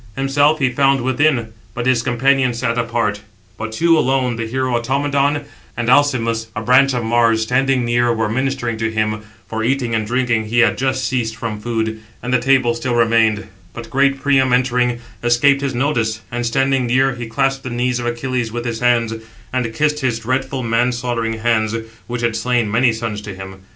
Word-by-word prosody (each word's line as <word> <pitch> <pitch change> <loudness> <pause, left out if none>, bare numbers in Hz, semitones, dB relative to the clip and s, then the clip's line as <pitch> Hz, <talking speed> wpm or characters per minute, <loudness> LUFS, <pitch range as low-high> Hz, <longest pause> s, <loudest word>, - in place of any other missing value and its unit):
Himself 145 +3 +2
he 135 -4 +1
found 135 +1 +2
within; 130 -3 +1 0.2
but 120 -1 -3
his 130 -2 +3
companions 130 +1 +1
sat 115 -1 -1
apart; 115 -3 -1 0.3
but 110 0 -5
two 165 +9 +3
alone, 130 -3 +1
the 115 0 -4
hero 130 +1 -1
Automedon, 140 +3 0 0.3
and 120 0 -1
Alcimus, 115 -6 +2
a 105 - -3
branch 130 +2 +4
of 120 - -1
Mars, 115 -1 +2
standing 125 +1 +1
near, 120 0 +2
were 110 -1 0
ministering 125 0 -2
to 115 0 -1
him 110 -1 -1 0.3
(for, 110 0 -3
eating 125 -1 0
and 110 -1 -1
drinking, 120 -2 0
he 115 +3 -3
had 115 -4 +3
just 130 0 0
ceased 115 -4 -2
from 110 -2 -5
food, 110 -1 -2 0.2
and 125 +1 -2
the 125 - +4
table 130 -2 +3
still 120 +1 -2
remained); 115 -2 +2 0.3
but 115 -1 -9
great 135 0 +2
Priam, 135 -2 +2
entering, 125 -1 +1 0.3
escaped 140 +4 +3
his 140 -3 -2
notice, 120 -5 0
and, 120 0 -2
standing 135 +1 +1
near, 130 +2 +2
he 120 -1 -6
clasped 135 +4 0
the 130 - -6
knees 125 +1 -1
of 120 - -3
Achilles 120 -1 -2
with 120 +1 -4
his 115 -2 -3
hands, 120 -2 +2 0.4
and 125 -3 -1
kissed 150 +5 0
his 130 -5 0
dreadful 130 +3 -2
man 115 +2 +1
slaughtering 120 -2 -2
hands, 110 -1 0 0.3
which 120 0 -4
had 115 -2 0
slain 115 -1 0
many 120 +2 +3
sons 110 -2 -4
to 100 -2 -8
him. 95 0 -9
120 Hz, 190 wpm, -18 LUFS, 115-130 Hz, 0.4 s, branch